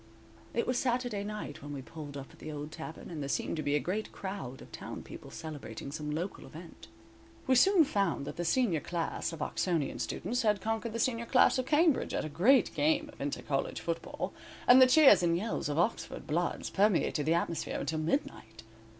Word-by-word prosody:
It 235 - +1
was 250 0 0
Saturday 245 -5 -1
night 210 -7 -6
when 145 0 -7
we 135 -2 -6
pulled 145 -1 -8
up 135 -1 -8
at - - -19
the 155 - -7
old 150 +1 -6
tavern, 160 +1 -8
and 155 -3 -5
there 140 - -4
seemed - - -1
to - - -1
be 145 0 +1
a - - +3
great 200 +8 -3
crowd 190 -10 -6
of - - -13
town - - -7
people - - -10
celebrating 145 -5 -7
some 150 0 -5
local 165 +6 -3
event. 165 +2 -12 0.6
We 260 - +3
soon 360 +7 +6
found 200 - 0
that - - -6
the 175 - -3
senior 180 -2 +2
class 170 +2 -3
of 160 -3 -4
Oxonian 165 -6 -1
students 245 +2 -2
had 210 -3 +2
conquered 225 +2 -2
the 230 - -3
senior 235 -1 0
class 255 +1 +5
of 255 - -2
Cambridge 310 0 +3
at - - -1
a - - -4
great 235 - +4
game 310 +1 +1
of - - -13
inter - - -3
college - - -2
football - - -4 0.3
and 255 +1 +9
the 255 - +9
cheers 270 - +7
and 170 -1 +2
yells 205 -5 -2
of 145 - -2
Oxford 170 -2 -1
bloods 170 +3 -1
permeated 190 -7 +2
the 165 - +4
atmosphere 170 -1 -2
until 160 -1 -2
midnight. 155 - -3
175 Hz, 205 wpm, -31 LUFS, 155-235 Hz, 0.6 s, and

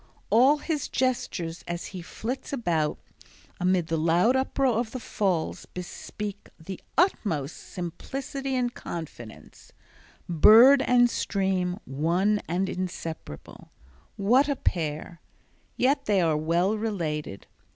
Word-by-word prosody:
All 265 +6 +6
his 300 -1 -3
gestures 200 -10 -2
as 175 0 -4
he 185 - -6
flits 230 +9 -5
about 170 - 0 0.6
amid 180 -1 +2
the 165 -1 -1
loud 175 +10 +3
uproar 265 -2 +1
of 230 -2 -3
the 255 - -4
falls 190 -8 -2
bespeak 200 +3 -7
the 180 +3 -8 0.2
utmost 165 - +1 0.2
simplicity 265 - -4
and 245 -1 0
confidence—bird 175 - +2
and 245 -2 +5
stream 190 -5 -1
one 175 +9 +1
and 180 +4 0
inseparable. 175 - -6 0.5
What 250 +9 +3
a 285 - +1
pair! 160 - -3 0.6
yet 275 +2 +2
they 205 -2 +3
are 165 -3 +2
well 170 +6 +1
related. 160 - -3
190 Hz, 110 wpm, -26 LUFS, 165-245 Hz, 0.6 s, All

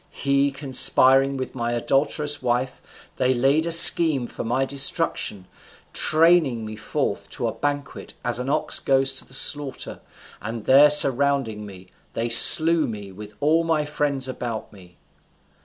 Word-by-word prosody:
He 140 0 -2
conspiring 135 0 +3
with 130 - -7
my 120 -2 -4
adulterous 145 +4 -1
wife, 125 +1 -4 0.4
they 130 0 0
laid 140 +6 0
a - - -3
scheme 160 -5 +5
for - - -9
my 125 +4 -2
destruction, 135 -7 -2 0.5
training 155 -8 +1
me 110 0 -9
forth 110 0 -5
to - - -4
a - - -3
banquet 145 -1 -6
as 120 0 -3
an 125 +2 -6
ox - - +1
goes 135 0 0
to - - -4
the 130 - -7
slaughter, 145 0 -2 0.4
and, 110 +1 -8
there 140 +3 +5
surrounding 135 -6 0
me, 95 -2 -15 0.2
they 115 +1 -4
slew 160 +7 +6
me 105 -3 -9
with 105 +2 -13
all 160 +3 +1
my 160 -2 -2
friends 145 -3 -3
about 120 -4 -8
me. 90 -3 -19
135 Hz, 150 wpm, -21 LUFS, 120-145 Hz, 0.5 s, slew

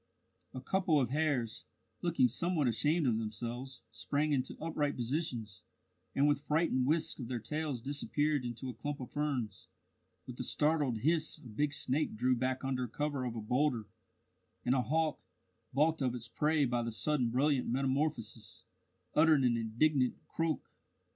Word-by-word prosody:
A 130 - -4
couple 180 0 +2
of 125 -3 0
hares, 140 -7 0 0.4
looking 170 -7 +3
somewhat 155 +4 0
ashamed 150 +7 +2
of 115 -3 +2
themselves, 120 +3 -5
sprang 145 +7 -1
into 130 -3 -1
upright 150 -2 -1
positions, 120 - -2 0.5
and 140 +2 +4
with 145 -1 +2
frightened 150 -4 +1
whisks 160 +1 +1
of 125 - -5
their 125 0 -2
tails 135 +2 -3
disappeared 145 +1 0
into 120 +2 -5
a 125 - -4
clump 140 +6 -4
of 125 - -7
ferns. 135 -8 -2 0.6
With 125 -1 -9
a - - -1
startled 145 -5 +1
hiss 155 +1 +2
a - - -17
big 145 +7 0
snake 145 0 0
drew 125 +3 +2
back 130 +2 -1
under 130 -2 -1
cover 140 +2 -2
of 120 -2 -3
a 115 - -3
boulder, 125 0 +1 0.8
and 125 - +3
a 130 - +3
hawk, 155 +3 0 0.5
balked 155 +3 +2
of 125 -2 +1
its 120 -1 -6
prey 150 +5 +2
by 120 -1 0
the 115 0 -3
sudden 130 +1 +1
brilliant 135 +2 +2
metamorphosis, 120 -4 -1 0.5
uttered 155 -2 +5
an 120 -2 +3
indignant 125 +4 +2
croak. 165 -1 -1
135 Hz, 160 wpm, -33 LUFS, 120-150 Hz, 0.8 s, uttered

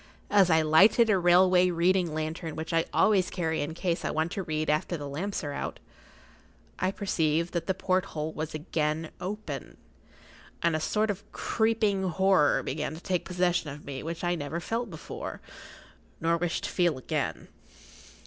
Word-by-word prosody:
As 195 -3 +5
I 160 -1 +4
lighted 205 +9 +5
a 195 - +3
railway 180 +1 +5
reading 175 0 +2
lantern 155 +1 -4
which 160 0 -5
I[Pg 165 0 +2
46] - - -24
always 200 -4 +4
carry 160 -4 -1
in 150 +2 -4
case 170 -1 -1
I - - -1
want 160 +2 -1
to 200 - -3
read 155 -3 -2
after 155 +3 0
the 145 -1 -6
lamps 175 +8 -3
are 145 - -3
out, - - -4 1.0
I - - +1
perceived 170 -4 0
that 170 - -2
the 190 - +1
porthole 180 -5 -1
was 155 0 -4
again 155 0 -2
open, 180 - -5 0.9
and 170 -1 +3
a - - 0
sort 210 +7 +1
of 200 0 -9
creeping 220 -3 +1
horror 190 -3 +3
began 150 +1 -3
to - - -9
take 180 -1 -1
possession 180 -3 0
of 145 +1 -9
me 135 -2 -5
which 165 +2 -5
I 175 0 +1
never 160 0 -3
felt 230 +6 -3
before, 160 -4 -7 0.8
nor 165 +1 +2
wish 170 0 -1
to - - -3
feel 175 -6 +2
again. 130 - -3
170 Hz, 175 wpm, -28 LUFS, 155-185 Hz, 1.0 s, As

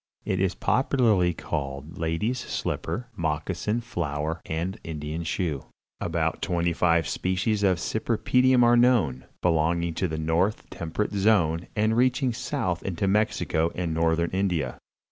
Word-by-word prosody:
It - - 0
is 95 -1 +1
popularly 115 -9 +2
called 70 -1 -5
"Lady's 85 +10 -1
Slipper," 120 0 -3
"Moccasin 85 +7 -1
Flower" 80 -6 -3
and 85 +4 -3
"Indian 75 +1 -4
Shoe." 80 -4 -2 0.3
About - - -1
twenty 85 -1 0
five 85 -3 +2
species 95 - 0
of 95 -3 +3
cypripedium 125 +6 +2
are 120 0 +6
known, 115 - +3 0.2
belonging 85 0 +2
to 90 +3 -1
the 80 -1 -4
north 80 +6 0
temperate 85 +6 -3
zone 95 -5 +2
and 110 +1 +2
reaching 125 +1 +2
south 95 - -2
into 95 +1 -2
Mexico 95 -5 +1
and 85 -3 -2
northern 80 +1 +1
India. 90 -9 -1
90 Hz, 130 wpm, -26 LUFS, 80-105 Hz, 0.3 s, are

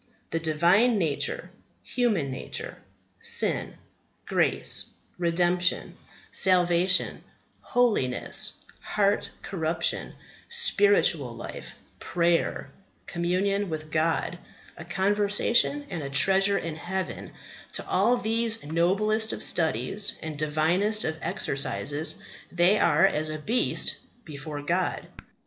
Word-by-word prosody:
The 165 - 0
Divine 175 +9 +3
Nature, 160 -7 -2 0.3
human 210 - 0
nature, 130 - -6 0.4
sin, - - +1 0.5
grace, - - +1 0.3
redemption, 175 +1 +1 0.4
salvation, 180 -1 +2 0.4
holiness, 215 - 0 0.3
heart 200 -1 0
corruption, 165 -2 -2 0.3
spiritual 470 -2 +3
life, - - -8 0.2
prayer, 170 -1 0 0.3
communion 185 +3 -1
with 155 -1 -6
God, 165 +2 0 0.4
a 170 - -10
conversation 205 +9 +1
and 175 - -3
a 140 - -5
treasure 195 +8 +3
in 160 -3 -4
heaven, 190 +3 -4 0.4
to - - -2
all 225 +7 +3
these 225 -1 0
noblest 205 +8 +1
of - - -6
studies 160 - 0
and 160 -1 -5
divinest 160 +8 +1
of 160 - -1
exercises 145 +2 -1 0.3
they 180 +4 +3
are 165 +2 +4
as 155 -4 0
a 155 - -4
beast 230 +11 0 0.3
before 145 -1 -7
God. 175 +4 -1
175 Hz, 100 wpm, -26 LUFS, 160-205 Hz, 0.5 s, are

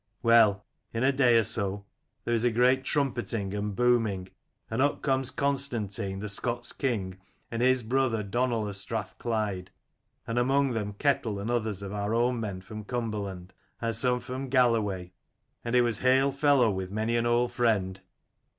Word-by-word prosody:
"Well, 110 -4 +5 0.3
in 115 - 0
a 135 - +4
day 125 -4 +4
or 115 - +4
so 100 -1 -1 0.4
there 120 - -1
is 115 -1 +1
a 120 - +4
great 125 +3 +3
trumpetting 120 -8 -1
and 105 0 -3
booming, 115 -6 +1 0.4
and 115 +3 -1
up 145 +1 +1
comes 135 -2 +1
Con 140 +2 +1
stantine 100 -7 -2
the 105 - -4
Scots' 120 +4 -2
king, 100 -9 -2 0.3
and 115 0 -2
his 130 0 +3
brother 120 -2 0
Donal 115 +1 -1
of 100 - -5
Strathclyde, 100 -1 -3 0.6
and 115 +1 -1
among 135 +2 +2
them 105 -3 -3
Ketel 115 -3 0
and 105 +4 -3
others 110 -5 -1
of 100 0 -6
our 105 +2 -1
own 120 +1 +1
men 100 -4 -4
from 110 +3 -8
Cumberland, 100 -6 -4 0.3
and 115 -1 -1
some 125 +2 +2
from 130 +2 -6
Galloway: 110 -8 +1 0.5
and 120 +1 -2
it 125 - +6
was 120 -3 -1
hail 130 +2 +3
fellow 140 -4 +3
with 95 -1 -4
many 110 +3 -1
an 120 0 +1
old 120 +1 +2
friend. 100 -6 0
115 Hz, 170 wpm, -28 LUFS, 100-125 Hz, 0.6 s, it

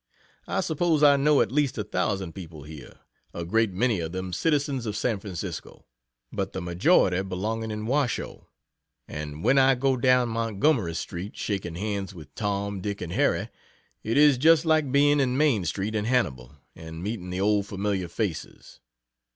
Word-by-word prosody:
I - - 0
suppose 160 -1 +1
I 145 -1 +7
know 145 +1 +4
at - - 0
least 140 -2 +1
a 105 - -1
thousand 95 -2 -2
people 80 -6 -9
here 75 -3 -12 0.3
a 85 - -4
great 110 +4 +1
many 105 +2 +1
of 80 0 -4
them 95 -1 -4
citizens 140 - 0
of 105 -1 -3
San 110 -2 0
Francisco, 95 -4 -7 0.5
but 95 -1 -3
the - - -3
majority 90 - +2
belonging 105 +4 -3
in 105 0 -4
Washoe 135 0 -2 0.6
and 75 +1 -6
when 135 +5 +4
I 135 0 +5
go 135 +1 +1
down 125 -1 +3
Montgomery 115 - 0
street, 90 +4 -6
shaking 95 -5 -3
hands 100 0 -3
with 75 -4 -12
Tom, 100 0 -2
Dick 100 +1 -4
and 85 -1 -5
Harry, - - +1 0.5
it 115 +4 -1
is 145 -3 +6
just 160 +2 +5
like 155 -4 +2
being 145 +1 +4
in 130 -2 +1
Main 135 - +2
street 95 +7 -2
in 105 -1 -1
Hannibal 70 - -1 0.2
and 80 +1 -9
meeting 100 -3 -4
the 90 +1 -3
old 100 0 +2
familiar 100 -2 -2
faces. 85 - -5
105 Hz, 170 wpm, -26 LUFS, 90-130 Hz, 0.6 s, I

